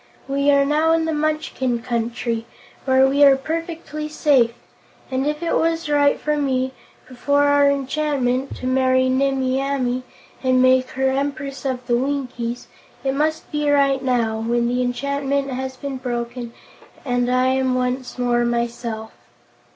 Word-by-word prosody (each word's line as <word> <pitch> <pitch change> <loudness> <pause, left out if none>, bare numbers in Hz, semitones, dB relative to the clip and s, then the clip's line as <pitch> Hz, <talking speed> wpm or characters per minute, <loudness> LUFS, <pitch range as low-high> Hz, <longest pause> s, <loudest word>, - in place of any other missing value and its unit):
We 280 +1 +1
are 280 -1 +4
now 310 +3 +2
in 325 0 +1
the 320 - -1
Munchkin 295 -6 -1
Country, 230 -1 -2 0.4
where 260 0 +5
we 280 +2 +3
are 275 -1 +8
perfectly 320 +1 -5
safe, 280 -6 +3 0.6
and 265 +2 0
if 300 +2 -2
it 335 - 0
was 330 0 0
right 290 -1 +3
for 300 0 0
me, 260 -2 0 0.3
before 285 +3 +1
our 285 0 +4
enchantment, 275 -2 -1
to - - -8
marry 260 0 +2
Nimmie 265 0 +1
Amee 255 -2 -1 0.4
and 255 -1 +2
make 255 0 +4
her 265 0 +2
Empress 275 0 -3
of 255 -2 -2
the 240 -1 +2
Winkies, 250 -3 -3 0.4
it 270 -1 0
must 310 +3 -1
be 295 -1 0
right 275 -2 +3
now, 235 -4 0
when 235 +1 0
the 250 +1 0
enchantment 275 +2 -1
has 260 0 -4
been 280 -1 -5
broken 240 -1 -4 0.5
and 245 -1 0
I 255 +1 +3
am 260 -1 +1
once 250 0 -2
more 240 -1 +1
myself. 235 -2 -3
265 Hz, 150 wpm, -21 LUFS, 250-285 Hz, 0.6 s, are